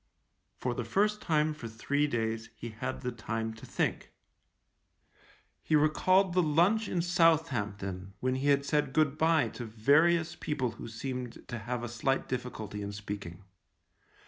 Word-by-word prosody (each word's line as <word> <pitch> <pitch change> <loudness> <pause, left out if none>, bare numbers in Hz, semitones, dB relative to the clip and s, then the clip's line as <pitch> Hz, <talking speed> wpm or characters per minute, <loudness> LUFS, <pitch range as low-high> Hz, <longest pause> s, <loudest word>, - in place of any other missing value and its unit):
For 125 - -1
the 120 - -3
first 210 - +1
time 155 -2 +2
for 120 -6 -7
three 145 +6 0
days 115 -3 -2
he 120 - -7
had 125 +4 -5
the 125 -1 -2
time 115 -1 -3
to 110 - -12
think. - - -1 1.5
He 155 - +1
recalled 180 +5 +4
the 180 - +4
lunch 175 +8 +3
in 175 -2 0
Southampton 105 - +1
when 130 0 0
he 130 +2 -1
had 140 -1 +3
said 145 -2 +1
good 155 -2 +3
bye 160 0 +3
to 120 - -7
various 155 +10 +3
people 130 -5 -2
who - - -9
seemed 125 +1 -6
to 120 - -4
have 120 +3 -3
a - - -2
slight 120 +4 -1
difficulty 110 -5 -4
in 100 0 -4
speaking. 100 -3 -6
130 Hz, 155 wpm, -31 LUFS, 110-155 Hz, 1.5 s, recalled